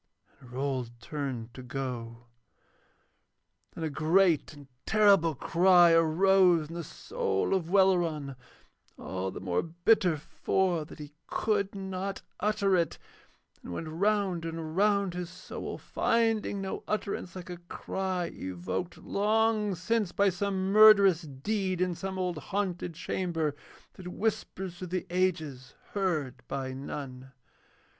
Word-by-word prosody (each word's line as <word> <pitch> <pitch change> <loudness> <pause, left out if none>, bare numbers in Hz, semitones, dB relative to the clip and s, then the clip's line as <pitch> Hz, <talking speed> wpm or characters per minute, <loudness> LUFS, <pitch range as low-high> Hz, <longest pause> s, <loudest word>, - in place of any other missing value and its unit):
And 125 -3 -15
Rold 125 -3 -3
turned 125 -3 -5
to 130 - -9
go. 125 -3 -5 1.5
Then 165 - -5
a 160 - 0
great 165 +3 +3
and 145 -2 -13 0.2
terrible 200 -7 +4
cry 175 +3 +5
arose 170 0 +4
in - - -8
the 170 0 -4
soul 95 - -2
of 175 -4 0
Welleran, 175 -8 +2 0.6
all 95 0 -4
the - - -7
more 90 -2 0
bitter 175 +1 +2
for 175 +2 0
that - - -12
he 150 -1 -9 0.2
could 205 -2 0
not 190 0 -4 0.2
utter 205 -1 +2
it, 170 -2 0 0.6
and - - -10
it - - -4
went 160 - -5
round 195 0 0
and 165 -1 -5
round 200 -1 +2
his 175 -1 -4
soul 185 0 -7
finding 225 -3 0
no 190 - -4
utterance, 200 -3 -3
like 180 -1 -7
a 175 - -6
cry 180 +1 -3
evoked 95 - -4
long 215 0 +1
since 205 +2 0
by 200 +1 +3
some 190 +1 -1
murderous 200 -4 +7
deed 185 +6 -2
in 180 -1 +1
some 190 +2 -5
old 180 -3 -2
haunted 180 -3 -3
chamber 165 -3 -2 0.4
that 185 - -10
whispers 190 -3 -3
through 185 - -5
the 185 +1 -3
ages 160 -8 -1 0.2
heard 165 -10 -1
by 135 -1 -3
none. 135 -1 -7
175 Hz, 135 wpm, -29 LUFS, 150-195 Hz, 1.5 s, murderous